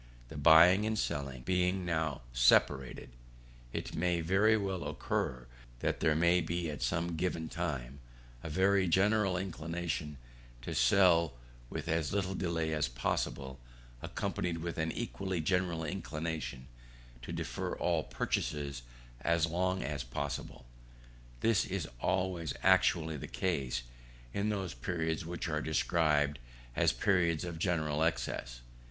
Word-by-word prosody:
The - - -9
buying 90 +5 +7
and 110 0 0
selling 70 -8 -2
being 90 +2 +1
now 80 -5 -1
separated, 60 +2 +3 0.6
it - - -4
may 85 +1 +1
very 95 +7 +4
well 95 -3 -2
occur, 65 -1 -2 0.4
that - - 0
there 80 - +3
may 85 +2 +4
be, 85 -1 -2
at 75 - -7
some 85 0 0
given 80 -1 -1
time, 70 -6 -4 0.4
a 80 - -6
very 95 +3 +3
general 95 +1 +3
inclination 85 -4 -3 0.5
to - - -4
sell 85 +2 +4 0.4
with - - -5
as 80 -2 0
little 95 -1 0
delay 85 -4 -1
as 75 -4 +1
possible, 65 +1 -2 0.4
accompanied 85 -2 -2
with 85 0 -4
an 80 0 0
equally 95 -6 -3
general 85 0 0
inclination 80 -5 -4 0.6
to - - -7
defer - - -3
all 85 -3 +1
purchases 70 +1 -2 0.4
as 85 +3 +2
long 90 +3 0
as 75 -3 -3
possible. 65 0 -5 0.8
This 115 -2 +3
is 95 -3 -3
always 90 -4 -1
actually 85 -4 +4
the - - -6
case, 65 -10 -1 0.5
in 100 +1 0
those 95 -5 -2
periods 80 +5 -2
which 85 +1 -4
are 75 -1 -1
described 75 -2 +2 0.4
as - - +4
periods 85 -5 +2
of 85 -2 -5
general 80 -4 0
excess. - - -2
85 Hz, 130 wpm, -33 LUFS, 75-90 Hz, 0.8 s, buying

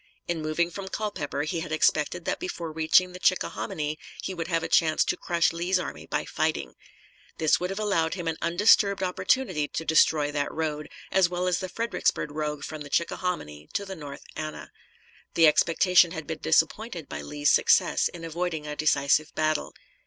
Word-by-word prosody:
In 170 -2 -2
moving 155 +3 0
from 195 +2 -7
Culpeper 205 -8 -3
he 155 +2 -2
had 165 -1 -6
expected 155 +2 +1
that - - -1
before 175 - -5
reaching 160 +3 +3
the 180 - -9
Chickahominy 155 -4 -1 0.2
he 190 - -3
would 170 -2 -4
have 165 -2 0
a - - -2
chance 155 -2 +3
to - - 0
crush 170 -1 +1
Lee's 175 +3 0
army 80 - -6
by - - -2
fighting. - - -2 0.6
This 155 -2 +3
would 180 - -2
have 195 - -4
allowed 195 -7 0
him 175 -3 -5
an 160 -1 -1
undisturbed 200 +2 +4
opportunity 185 - 0
to 165 - -5
destroy 150 -2 +3
that 145 -1 -2
road, 150 -2 -3 0.2
as 190 -2 +4
well 180 0 -2
as 180 -1 +1
the 185 - -5
Fredericksburg 230 -7 -1
road 150 -1 -3
from 155 -1 -7
the 145 - -8
Chickahominy 140 - -2
to 200 - -2
the 190 -1 -7
North 145 -4 -9
Anna. 155 0 -6 0.6
The 165 - +6
expectation 170 +3 +5
had 160 -3 -6
been 160 -1 -5
disappointed 160 +3 0
by - - -6
Lee's 145 0 +1
success - - +4
in 165 -1 -9
avoiding 165 -1 -3
a 150 0 -5
decisive 150 0 +2
battle. 155 -1 0
165 Hz, 180 wpm, -26 LUFS, 155-180 Hz, 0.6 s, The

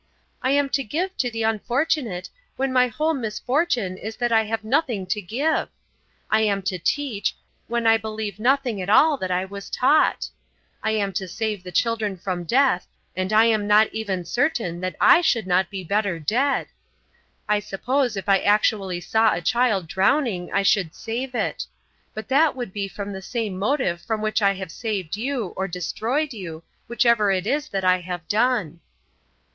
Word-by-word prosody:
I 255 - 0
am 285 +1 +3
to 275 0 0
give 350 - -3
to 250 - 0
the 225 -1 -3
unfortunate, 225 - -1 0.3
when 270 0 -1
my 250 -1 +4
whole 310 +7 0
misfortune 245 - -1
is 220 +3 -6
that 240 -1 -1
I 220 -1 +4
have 225 +1 -3
nothing 235 - 0
to 200 +3 -2
give. 255 - -1 0.6
I 220 - +4
am 200 -2 +1
to 185 -2 -2
teach, 235 - -1 0.3
when 235 0 -1
I 225 0 +6
believe 215 -1 -5
nothing 250 -3 +1
at 185 - -4
all 300 +8 +6
that 185 -6 -4
I 180 +1 0
was 200 +1 -9
taught. 300 +5 +2 0.5
I 220 - 0
am 205 -3 0
to 190 +1 -3
save 215 +1 -3
the 180 0 -9
children 220 -2 0
from 180 -1 -4
death, 255 -2 +2 0.3
and 185 +2 -2
I 220 +1 +6
am 215 -3 +2
not 210 +1 +4
even 195 -5 -3
certain 235 - -1
that 185 0 -3
I 355 -1 +7
should 235 - +1
not 185 0 +2
be 195 -2 -6
better 200 0 0
dead. 245 - +1 0.8
I 210 0 +2
suppose 240 +4 -1
if 195 - -5
I 195 -1 +5
actually 200 -3 +1
saw 220 +5 +2
a - - -2
child 215 -1 +1
drowning 195 - +1
I 200 - +1
should 195 -5 +2
save 250 +3 -4
it. 220 - -2 0.5
But 220 - -6
that 295 +2 +4
would 245 -7 -6
be 200 -1 -2
from 200 +1 -6
the 190 - -6
same 220 -1 -3
motive 210 -6 0
from 220 +3 -2
which 215 +1 0
I 200 -1 +4
have 190 -2 -7
saved 200 -5 -3
you, 235 -3 -3
or 190 - -2
destroyed 230 - -2
you, 170 -6 -8 0.2
whichever 235 -3 +3
it 185 -1 0
is 295 +6 -1
that 195 -1 -2
I 185 0 +4
have 175 -2 -6
done." 215 -7 +1
215 Hz, 185 wpm, -23 LUFS, 190-250 Hz, 0.8 s, I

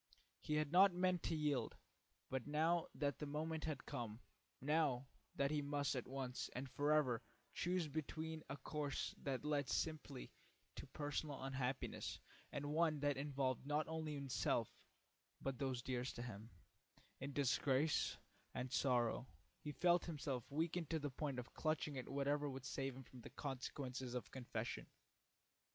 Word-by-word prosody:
He 150 - 0
had 150 -1 +2
not 185 +1 +8
meant 180 -1 +3
to 165 - +2
yield, 145 -6 +1 0.5
but 130 -1 -2
now 160 +3 +3
that 145 -2 0
the 150 - -2
moment 155 +2 -1
had 155 -4 -2
come, 115 -2 -3 0.4
now 145 -3 +3 0.3
that 140 +1 +2
he 150 -1 +2
must 145 0 +1
at 125 - -2
once 130 -1 -2
and 130 +2 -2
forever 145 -3 +3 0.3
choose 180 -1 +1
between 160 +1 -3
a 140 - -3
course 145 -1 -1
that 135 0 -1
led 145 -3 +2
simply 155 - -1 0.4
to - - -7
personal 145 -1 -2
unhappiness 135 0 -1 0.3
and 145 0 -2
one 160 -2 +4
that 145 -1 +3
involved 135 -2 0
not 150 +1 +2
only 160 -2 -2
himself, 130 -4 +1 0.6
but 135 -1 -2
those 130 -3 0
dearest 125 0 -1
to 120 - -3
him, 110 -2 -6 0.7
in 135 +2 -3
disgrace 140 +2 +3 0.4
and 125 0 -2
sorrow, 125 -1 +3 0.3
he 150 - -4
felt 175 +4 +4
himself 140 -7 -2
weaken 165 +3 0
to 165 - +1
the 145 -2 -2
point 140 0 -2
of 125 0 -5
clutching 155 -2 +1
at 130 - -4
whatever 145 +1 +2
would 135 -1 -5
save 135 -1 -1
him 135 - -7
from 125 0 -12
the - - -8
consequences 130 -2 -3
of 115 -5 -3
confession. 130 -2 -3
140 Hz, 155 wpm, -42 LUFS, 130-155 Hz, 0.7 s, not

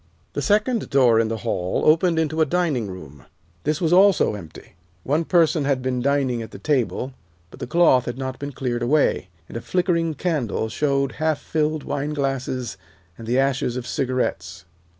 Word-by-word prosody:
The 145 - -2
second 210 - +1
door 125 -5 +4
in 115 - +2
the 115 0 -3
hall 90 +1 -1
opened 165 +2 +4
into 160 0 0
a - - +7
dining 150 - 0
room. 75 -7 -11 0.4
This 150 +1 0
was 170 -1 +1
also 195 - +5
empty. 90 -7 -11 0.3
One 150 +5 +1
person 165 -3 +3
had 135 -2 0
been 125 -1 -1
dining 135 -3 +1
at 110 - -7
the - - -10
table, 135 -2 -1 0.4
but - - -13
the - - -5
cloth 135 -5 +4
had 120 - -4
not 130 -1 -5
been 140 0 -5
cleared 125 -3 -3
away, 135 -5 +1 0.2
and - - -12
a 115 - -3
nickering 170 -3 +1
candle 130 - -1
showed 140 0 0
half 155 -2 +1
filled 155 -1 -1
wineglasses 135 -4 -3 0.4
and 115 - -10
the 120 +2 +1
ashes 135 -2 0
of 125 - -5
cigarettes. 90 -11 -2
135 Hz, 175 wpm, -22 LUFS, 120-155 Hz, 0.4 s, a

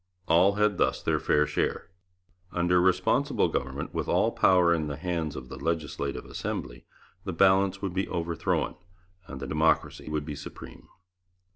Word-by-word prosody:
All 90 +5 +5
had 105 -1 +1
thus - - +2
their - - +1
fair 75 0 +2
share. 85 - -2 0.6
Under 90 0 +2
Responsible 95 0 +2
Government, 65 +2 -3
with - - -2
all - - +2
power 90 -2 +4
in 80 -2 -1
the 70 -1 -4
hands 80 -3 -3
of 65 -2 -7
the - - -8
Legislative 80 -4 -3
Assembly, - - -5 0.4
the 95 - -4
balance 95 +2 +3
would 95 -3 -2
be 95 +1 -1
overthrown 85 -2 -1 0.5
and 65 - -8
the - - -5
democracy 75 0 0
would 75 -1 -2
be 75 - -5
supreme. 75 - -10
85 Hz, 155 wpm, -27 LUFS, 75-95 Hz, 0.6 s, All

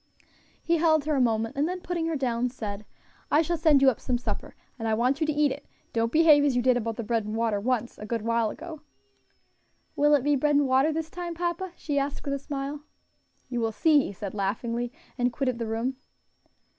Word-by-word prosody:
He 335 0 +2
held 315 -2 +3
her 305 -1 +1
a 270 - +2
moment, 225 +1 +1
and 290 +4 +1
then 365 0 -3
putting 340 -2 -2
her 325 - -1
down, 250 -3 0
said, 210 -4 -6 0.4
"I 305 +3 +4
shall 340 +2 -1
send 310 -4 +4
you 265 - +7
up 235 - -9
some 250 -2 -1
supper, 240 - -5 0.2
and 225 - -2
I 220 - +2
want 255 +6 +1
you 310 - +2
to - - +2
eat 295 -1 +2
it; 285 - -7 0.3
don't 230 0 +1
behave 310 -1 +6
as 280 -3 +2
you 245 - +2
did 255 -1 +4
about 230 -2 -2
the 235 - -4
bread 225 0 0
and 210 +1 -5
water 225 -2 0
once, 240 +1 -2
a 210 - -7
good 230 -1 -2
while 230 -1 +1
ago." 320 +4 -8 1.1
"Will 295 +1 +5
it 275 - +1
be 290 0 +3
bread 295 +2 +2
and 285 -1 +3
water 265 +4 +3
this 320 0 -3
time, 350 -1 -5
papa?" 345 +1 -3
she 290 -4 -1
asked, 280 0 -3
with 280 - -1
a 280 - -2
smile. 280 +1 -5 0.7
"You 245 -2 -3
will 225 -1 0
see," 300 +6 +4
he - - -5
said, 200 0 -6
laughingly, 230 +4 -2 0.3
and 245 0 +2
quitted 255 -1 -1
the 230 - -2
room. 230 +4 -2
265 Hz, 230 wpm, -27 LUFS, 230-300 Hz, 1.1 s, you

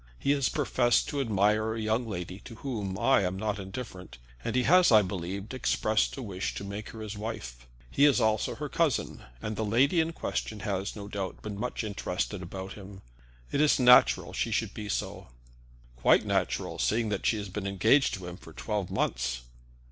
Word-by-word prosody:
He 140 - +1
has 140 -2 +2
professed 125 -4 +2
to 145 - -1
admire 110 -1 +2
a - - -4
young 110 +2 0
lady 90 -2 -5
to 115 - -9
whom 105 -7 -4
I 135 -2 +4
am 95 0 -1
not 105 0 -2
indifferent, 95 -1 -8 0.3
and 115 - -2
has, 170 +8 +5
I 110 -2 +7
believe, 95 +3 -5
expressed 110 -3 +1
a 135 - -5
wish 95 -4 -4
to - - -5
make 100 +2 -6
her 110 - -9
his 105 -1 -5
wife. - - -6 0.2
He 145 - +4
is 145 -3 +5
also 110 0 +1
her 150 - -4
cousin, 160 -2 0 0.2
and 105 0 -3
the 110 - -2
lady 130 - +3
in 160 +1 +1
question 110 -9 -4
has, 100 -1 -2
no 100 -2 -7
doubt, 100 -2 -5
been 105 -1 -5
much 125 +1 -3
interested 100 -2 -3
about 95 +2 -7
him. 100 -1 -11 0.5
It 145 - +1
is 150 -2 +4
natural 125 0 +6
that - - -8
she - - 0
should - - -1
be 105 -1 -6
so." - - -3 0.7
"Quite 65 - +4
natural - - -1
seeing 110 0 +1
that 100 -2 -1
she 110 - +2
has 100 -2 -5
been 100 +1 -4
engaged 110 +8 +3
to 95 -2 -8
him 90 0 -7
for 80 - -14
twelve 105 +1 -3
months." - - -1
105 Hz, 195 wpm, -29 LUFS, 95-120 Hz, 0.7 s, I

